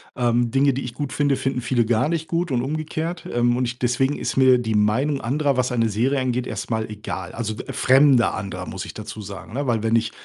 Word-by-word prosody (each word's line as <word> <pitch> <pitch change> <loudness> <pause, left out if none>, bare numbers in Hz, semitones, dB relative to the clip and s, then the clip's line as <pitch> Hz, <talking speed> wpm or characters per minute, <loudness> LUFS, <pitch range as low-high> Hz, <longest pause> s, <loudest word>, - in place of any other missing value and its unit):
ähm. 120 -1 +1
Dinge, 135 +3 +3
die 135 - -3
ich 120 -1 -7
gut 145 -3 -4
finde, 145 -1 +2
finden 130 -1 -2
viele 120 -1 +1
gar 115 +5 +1
nicht 160 -1 -2
gut 170 +1 -1
und 125 -2 +1
umgekehrt, 155 +4 -3
ähm. 120 0 +2
Und 125 0 -3
deswegen 130 +4 +1
ist - - -3
mir 130 -1 +6
die 115 -2 -2
Meinung 130 +8 +1
anderer, 140 +3 0
was 125 0 +1
eine 115 -2 +1
Serie 125 +7 +1
angeht, 125 -1 -1
erst - - -5
mal 110 -1 -1
egal. 95 -4 -6
Also, 110 -2 -3
f - - -6
fremde 130 -2 +5
andere, 100 -2 -5
muss - - -5
ich - - -9
dazu 110 - -7
sagen, 100 0 -9
ne, 140 +2 -2
weil 115 -3 0
wenn 115 0 +2
ich 115 -1 +1
125 Hz, 235 wpm, -22 LUFS, 115-135 Hz, -, mir